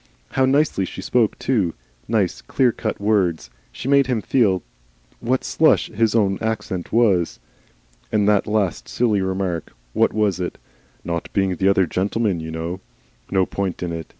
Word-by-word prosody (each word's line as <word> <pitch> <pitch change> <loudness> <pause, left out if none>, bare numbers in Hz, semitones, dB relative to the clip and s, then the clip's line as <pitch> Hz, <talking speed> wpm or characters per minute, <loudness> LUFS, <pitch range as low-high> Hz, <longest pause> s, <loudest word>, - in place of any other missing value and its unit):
How 130 - +2
nicely 140 -6 +2
she 90 - -6
spoke 115 -4 +1
too! 105 -11 0 0.3
nice - - 0
clear 120 - +2
cut 110 -1 -4
words! 95 - +1 0.2
She - - -7
made 140 -1 +4
him 120 -5 -1
feel 95 -6 +2 0.6
what 130 +2 0
slush 160 - +2
his 110 0 +1
own 100 -4 +2
accent 110 -5 -3
was. 100 -8 +2 0.7
And 105 -2 +2
that 105 0 +3
last 105 -5 -1
silly 110 -5 +1
remark. 95 -3 -2 0.2
What - - +3
was 105 -3 0
it? 90 - -3 0.5
'Not 85 -1 -4
being 95 -2 +1
the 95 +3 +1
other 95 -1 +4
gentleman, 100 +2 -1
you 80 0 -6
know!' 85 +3 -4 0.5
No 95 -1 +2
point 95 -2 -3
in 85 - -3
it. 80 -1 -5
100 Hz, 160 wpm, -21 LUFS, 90-115 Hz, 0.7 s, made